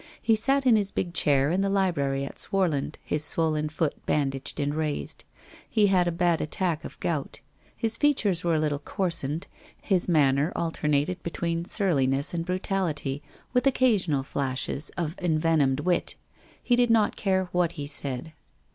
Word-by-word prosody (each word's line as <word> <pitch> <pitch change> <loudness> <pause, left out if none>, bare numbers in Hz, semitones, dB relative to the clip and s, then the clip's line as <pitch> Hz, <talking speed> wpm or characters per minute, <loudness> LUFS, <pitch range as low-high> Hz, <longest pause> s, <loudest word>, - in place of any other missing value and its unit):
He 225 - +3
sat 270 +5 +2
in 240 -4 +6
his 200 -2 0
big 175 -3 -3
chair 140 -2 +3
in 185 +3 +1
the 195 - +1
library 145 -9 0
at - - -9
Swarland, 175 -8 0
his 150 0 -1
swollen 155 -1 0
foot 155 -1 -2
bandaged 135 -1 -1
and 145 0 0
raised. 155 -1 -3 0.4
He 215 -2 +3
had 180 -1 +3
a - - +1
bad 170 -1 +1
attack 165 0 -1
of - - -9
gout. 155 -5 -3 0.4
His 230 0 -2
features 215 - +2
were 170 -2 +2
a - - +2
little 150 -2 0
coarsened; 160 -1 0 0.3
his 185 -3 0
man 140 -5 +4
ner 150 +5 +1
alternated 160 +1 0
between 170 0 -3
surliness 140 -8 +1
and 165 -1 -1
brutality, 175 -6 -2 0.3
with 250 0 +2
occa 255 -2 +4
sional 155 -9 0
flashes 140 +2 -3
of 165 -1 -2
envenomed 155 -5 +2
wit. 175 +2 0 0.5
He 245 - +3
did 245 0 +3
not 225 -2 +3
care 190 -2 0
what 175 -2 +1
he 145 -3 -5
said. 140 +1 -3
165 Hz, 165 wpm, -26 LUFS, 145-190 Hz, 0.5 s, in